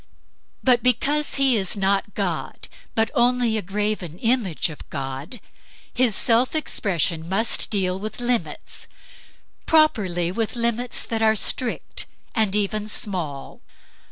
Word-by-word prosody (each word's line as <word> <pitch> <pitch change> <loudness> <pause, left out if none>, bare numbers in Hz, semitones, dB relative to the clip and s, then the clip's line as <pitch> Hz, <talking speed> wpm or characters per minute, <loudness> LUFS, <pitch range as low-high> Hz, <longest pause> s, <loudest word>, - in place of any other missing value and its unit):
But 245 -2 +4
because 285 +5 +1
he 275 -2 +4
is 195 -1 -1
not 195 +1 +1
God, 180 -6 -3 0.3
but 225 -1 +2
only 245 -1 +3
a 215 - 0
graven 200 -3 -2
image 225 -8 0
of 150 - -12
God, 140 - -5 0.5
his 245 -4 +2
self 240 +7 +3
expression 170 - -1
must 220 +5 +1
deal 190 -3 0
with 215 +3 -5
limits; 245 -1 -2 0.8
properly 195 - +3
with 225 +4 -2
limits 235 +1 0
that 225 -1 -3
are 220 0 +4
strict 235 +3 -2 0.3
and 215 -4 +2
even 210 +1 0
small. 175 -10 -2
215 Hz, 125 wpm, -23 LUFS, 185-240 Hz, 0.8 s, But